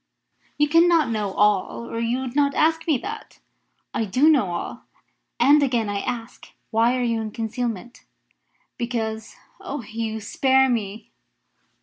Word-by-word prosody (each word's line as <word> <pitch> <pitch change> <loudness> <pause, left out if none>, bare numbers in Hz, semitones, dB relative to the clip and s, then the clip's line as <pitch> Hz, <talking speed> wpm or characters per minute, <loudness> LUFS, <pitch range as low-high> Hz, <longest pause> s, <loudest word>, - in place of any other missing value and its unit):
"You 295 0 +3
cannot 330 -3 +4
know 210 -3 -1
all, 210 +2 +1
or 230 - -4
you 235 +3 -1
would 260 -1 -6
not 285 -1 +2
ask 320 +1 +2
me 305 -4 +3
that." 435 +2 -7 0.6
"I 225 - 0
do 255 +10 +3
know 265 -10 +3
all; 175 - -5 0.5
and 290 +2 +6
again 240 -6 +1
I 200 0 -1
ask, 240 0 -6 0.2
why 230 +3 +3
are 250 - 0
you 230 -2 0
in 220 - -4
concealment?" 230 +1 -4 0.8
"Because 225 -2 -3 0.2
Oh, 285 -1 -5
Hugh 220 0 -4
spare 265 +4 +2
me!" 220 -2 -3
235 Hz, 145 wpm, -23 LUFS, 220-275 Hz, 0.8 s, and